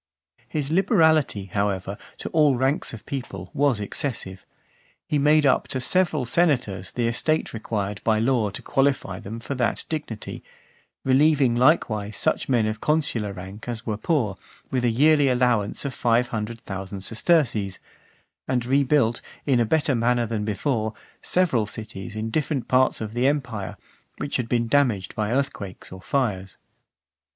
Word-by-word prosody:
XVII. - - -32
His 150 -1 -2
liberality, 160 - +3
however, 100 -1 -1 0.2
to - - -5
all 150 -4 +4
ranks 135 +4 0
of 115 - -10
people, 100 -9 -6
was 140 -5 +2
excessive. 100 -4 -4 0.6
He 150 - +1
made 150 +1 +4
up 135 - +3
to 130 - -3
several 155 0 +1
senators 120 - +1
the 120 - -1
estate 155 +7 0
required 105 -2 -3
(457) - - -32
by 110 -1 +3 0.2
law 105 - 0
to 95 - -7
qualify 135 -9 0
them 110 +4 -7
for 120 - -5
that 125 -3 0
dignity; 145 -9 -5 0.6
relieving 135 -2 +4
likewise 110 -6 +2
such - - 0
men 120 -4 +3
of 110 0 -3
consular 140 -9 +1
rank 95 +4 -9
as 115 -1 -4
were 110 - -1
poor, 110 - 0 0.3
with 130 -2 0
a 120 - +3
yearly 145 +4 +4
allowance 125 -3 +1
of 140 - -2
five 120 0 +2
hundred 115 +1 -4
thousand 95 0 -6
sesterces; 110 - +1 0.7
and 125 -2 0
rebuilt, 135 -2 +2 0.2
in 135 -4 +3
a 120 - +3
better 145 +3 +2
manner 120 0 +2
than 110 -2 -2
before, 110 +1 -1 0.3
several 155 - +1
cities 110 -1 -6
in 110 +1 -3
different 145 -4 -1
parts 130 -1 +3
of 110 0 -5
the 120 +2 +2
empire, 125 -9 -2 0.4
which 145 - -2
had 120 -3 -3
been 120 -1 +1
damaged 115 -8 +1
by 105 -1 -1
earthquakes 120 -8 -3
or 95 0 -9
fires. 95 -7 -1
120 Hz, 160 wpm, -24 LUFS, 105-140 Hz, 0.7 s, all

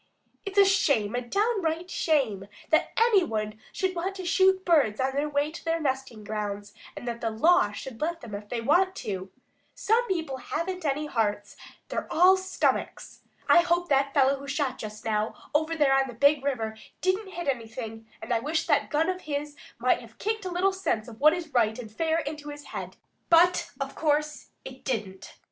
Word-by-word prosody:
"It's 395 0 -6
a 400 - +8
shame, 280 - +2
a 245 - -1
downright 360 - -1
shame 240 - 0 0.2
that 315 - +3
any 450 -4 +5
one 215 -6 -3
should 375 -1 -1
want 375 +3 -2
to 375 -2 -6
shoot 375 +2 +3
birds 290 -12 +3
on 265 +1 +1
their 290 +2 -1
way 290 +1 0
to 330 - -10
their 330 0 0
nesting 265 -6 -3
grounds 205 -1 -4 0.2
and 245 - -7
that 235 0 -4
the 225 - 0
law 225 0 +3
should 230 +4 -8
let 335 +2 -2
them 230 -3 -9
if 205 +1 -7
they 240 -2 -2
do - - -9
want 370 +7 +3
to. 190 -2 -5 0.4
Some 465 +3 +2
people 320 -8 -2
haven't 360 +7 -4
any 295 +1 0
hearts; 210 -7 -1 0.3
they're - - -4
all 365 +3 +6
stomachs. 375 0 -2 0.3
I - - +7
hope 345 0 +1
that 275 0 +3
fellow 275 0 +3
who 280 - -9
shot 275 -2 -1
just 215 -1 -8
now 215 0 0 0.2
over 315 +2 +1
there 290 -4 +3
on 270 0 +3
the 245 - -9
Big 280 +3 +4
River 225 -6 -2 0.3
didn't 380 +1 0
hit 345 -2 -5
anything, 225 -3 -4 0.2
and - - -2
I 230 - +2
wish 310 +6 -1
that - - +2
gun 315 +2 +1
of 370 0 -2
his 290 0 -4 0.2
might - - +2
have - - -15
kicked 435 -1 -2
a 365 - -3
little 375 +2 +2
sense 315 - -1
of 225 -2 -11
what 305 +3 +6
is 340 -3 -5
right 220 -3 +2
and 230 -4 -8
fair 320 +7 0
into 295 -1 -4
his 290 0 -8
head, - - -6 0.3
but 345 +2 +5
of - - -3
course 300 -1 0 0.2
it 260 0 -10
didn't." 195 -6 -4
290 Hz, 200 wpm, -27 LUFS, 230-345 Hz, 0.4 s, a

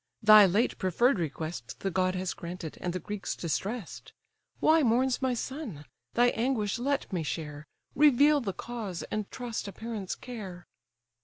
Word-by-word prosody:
thy 215 -1 +9
late 210 +7 +1
preferr'd 200 +6 +2
request 155 -7 -5
The 195 - -1
god 185 +1 +1
has 185 0 -2
granted, 170 -2 -7
and 180 - -1
the 180 - -2
Greeks 205 +3 -4
distress'd: 195 +6 -4 0.5
Why 320 +1 +5
mourns 255 +1 +2
my 260 -2 +1
son? 235 - -5 0.3
thy 245 +1 +5
anguish 230 -3 0
let 275 -4 -1
me 175 - 0
share, 150 -1 -5 0.3
Reveal 290 0 +5
the 205 -5 -2
cause, 210 -3 -5
and 215 -2 -2
trust 240 -4 -5
a - - -5
parent's 220 -3 -5
care." 195 -8 -8
210 Hz, 155 wpm, -29 LUFS, 180-245 Hz, 0.5 s, thy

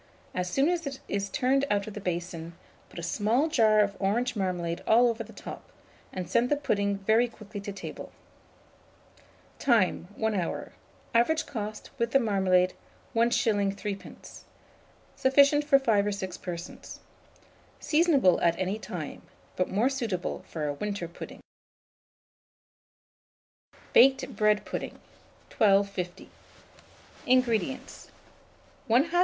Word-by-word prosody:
As 180 0 -2
soon 270 +9 +2
as 340 -3 0
it 275 -1 -5
is 200 0 -2
turned 270 +2 +1
out 200 -1 +1
of 215 - -8
the 210 - -6
basin, 170 -2 -4 0.4
put - - -14
a 170 - -5
small 225 - +1
jar 220 -8 +4
of 200 -1 0
orange 235 +6 0
marmalade 180 -4 -2
all 240 +2 +6
over 230 0 -3
the - - -14
top, - - -9 0.4
and 185 -2 -5
send 235 +7 +2
the 295 - +3
pudding 200 -8 0
very 220 +5 +3
quickly 215 -3 -9
to 200 - -5
table. 200 - -8 1.5
Time. 225 -9 +2
1 220 0 0
hour. 180 -4 -3 0.4
Average 310 +8 +3
cost, 215 -3 -6
with 235 0 0
the 275 - +6
marmalade, 190 -5 +2 0.4
1s. 225 -4 +2
3d. 200 -1 -8 0.7
Sufficient 280 +2 +4
for 290 -2 +5
5 220 -6 +2
or - - +1
6 190 -2 -4
persons. 170 -1 -7 0.8
Seasonable 300 - +3
at 170 0 +3
any 190 +3 -2
time; 170 -8 -6 0.3
but 185 - 0
more 215 +6 +2
suitable 230 -10 -3
for 155 -2 -4
a 145 - -1
winter 200 +2 -4
pudding. 170 - -10 2.5
BAKED 265 +1 +5
BREAD 210 -1 +2
PUDDING. - - -5 0.6
1250. 200 -4 +1 1.0
INGREDIENTS. 255 0 0 0.8
1/2 265 +9 +3
lb. 350 - +2
210 Hz, 130 wpm, -28 LUFS, 190-250 Hz, 2.5 s, all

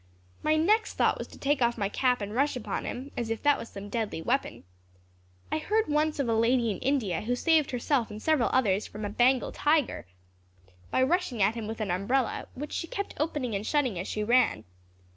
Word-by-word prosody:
My 310 0 +2
next 415 +8 +2
thought - - +2
was - - -5
to - - -14
take 285 0 0
off 235 0 +2
my 200 -3 0
cap 250 +3 +1
and 205 +1 -4
rush 280 +4 +1
upon 250 - -4
him, 265 +3 -5
as 235 -2 -3
if 225 -1 -3
that 290 -1 +4
was 230 - -7
some 200 0 -8
deadly 220 -5 -3
weapon. 250 - -1 0.9
I 310 - 0
heard 430 +7 +1
once 300 +1 +1
of 280 -3 0
a 230 - +2
lady 230 +1 +2
in 195 - -5
India, 245 - 0
who 245 +3 -1
saved 315 +2 +3
herself 245 -1 0
and 210 0 -7
several 300 -1 +2
others 215 -6 +2
from 210 0 -6
a - - -2
Bengal 250 +4 +3
tiger, 295 - +1 0.8
by 260 - +2
rushing 310 - 0
at 205 +3 +3
him 230 -2 -5
with 225 +1 -5
an 205 -4 -1
umbrella 225 +8 0
which 290 +3 -6
she 335 - -3
kept 400 +4 -4
opening 295 -6 -1
and 200 +2 -3
shutting 260 - +1
as 185 - -4
she 215 - -2
ran. 235 - +3
250 Hz, 215 wpm, -28 LUFS, 215-290 Hz, 0.9 s, that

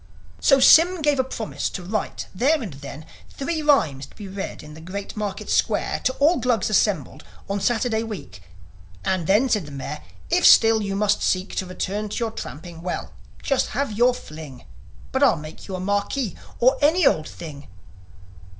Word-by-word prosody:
"' - - -25
So 275 -1 +7
Sym 335 +5 +6
gave 295 -2 +2
a - - +4
promise 235 -4 -4
to 180 - -7
write 205 +3 -3
then 270 +8 +2
and 190 -9 -6
there 140 +2 -9 0.2
Three 315 +3 -3
rhymes 180 - +2
to - - -22
be 205 - -8
read 195 +1 -6
in 150 0 -11
the 160 - -11
Great 195 +4 -6
Market 205 -2 -4
Square - - 0
To 260 - +2
all 310 +6 +3
Glugs 235 -4 +1
assembled 195 -8 +1 0.2
on 200 0 -2
Saturday 230 -1 +1
week. 185 - -7 0.6
"And 185 -4 0
then," 210 +7 +4
said 210 - 0
the - - -10
Mayor, 140 +2 -6 0.3
"if 355 0 +3
still 225 -1 +7
you 200 -1 -2
must 210 +1 +1
seek 185 +1 0
To 185 - -2
return 200 +3 -3
to - - -5
your 230 -2 -1
tramping, 165 -5 -8
well, 180 +1 -4 0.3
just 275 -2 +1
have 280 -3 0
your 245 +3 +3
fling; 155 - -10 0.5
But 265 - -1
I'll 275 -11 +5
make 155 +1 -10
you 190 - -4
a - - -4
marquis, 205 - -1 0.2
or 255 +3 +4
any 315 +4 +4
old 155 - +3
thing 145 -4 -9
205 Hz, 185 wpm, -23 LUFS, 175-255 Hz, 0.6 s, So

